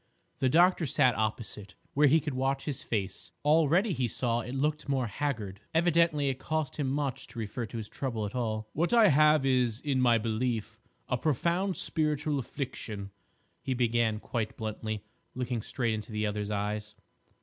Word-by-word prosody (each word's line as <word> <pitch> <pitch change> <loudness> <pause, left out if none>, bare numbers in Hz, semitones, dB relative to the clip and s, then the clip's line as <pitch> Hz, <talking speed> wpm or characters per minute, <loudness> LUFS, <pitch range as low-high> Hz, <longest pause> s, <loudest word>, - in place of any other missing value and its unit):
The 130 - +3
doctor 175 +2 +4
sat 125 -1 +4
opposite, 105 -2 -3 0.2
where 145 +1 +5
he 155 +4 +5
could 150 -2 -4
watch 135 +1 -1
his 140 -3 -3
face. 95 -4 -3
Already, 165 +6 +4
he 130 -4 0
saw, 120 +1 0
it 125 +3 -6
looked 150 +1 -1
more 135 -3 +1
haggard. 110 -5 -3 0.2
Evidently 165 -3 +3
it 130 -1 -3
cost 155 -2 -2
him 145 -3 0
much 140 -2 -2
to - - -12
refer 115 +1 -3
to 115 - -7
his 110 -2 -4
trouble 115 -5 -3
at 100 - -5
all. 110 -3 -2
"What 170 +8 0
I 225 -4 +7
have 150 -1 +5
is, 125 -4 +2
in 135 -2 0
my 120 -2 +5
belief, 115 0 -2 0.3
a - - 0
profound 170 +6 +1
spiritual 150 -2 0
affliction," 110 -7 -5 0.5
he 130 - -2
began 115 -3 +1
quite 110 -1 -3
bluntly, 110 -1 -4 0.3
looking 125 -2 -2
straight 120 0 -1
into 110 +1 -5
the 105 0 -1
other's 105 0 -2
eyes. 105 +1 -3
125 Hz, 170 wpm, -30 LUFS, 110-150 Hz, 0.5 s, I